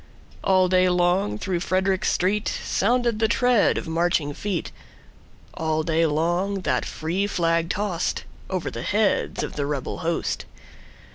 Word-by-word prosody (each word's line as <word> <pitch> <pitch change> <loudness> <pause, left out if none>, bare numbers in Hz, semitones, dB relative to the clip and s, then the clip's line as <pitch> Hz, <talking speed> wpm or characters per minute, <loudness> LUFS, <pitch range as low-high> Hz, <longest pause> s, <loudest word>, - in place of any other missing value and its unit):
All 185 -1 +4
day 185 0 +4
long 175 - +2
through 175 - -2
Frederick 190 +1 +1
streetSounded 215 +4 +1
the 220 - +3
tread 245 0 +3
of - - -4
marching 160 -3 +1
feet:All 160 -3 -5
day 165 +1 +2
long 175 +6 0
that - - 0
free 175 +6 -2
flag 165 -3 +1
tostOver 185 -1 -3
the 115 - -5
heads 205 - +1
of - - -6
the 140 -1 -1
rebel 140 -3 -3
host. 165 +1 -2
180 Hz, 125 wpm, -24 LUFS, 165-195 Hz, -, All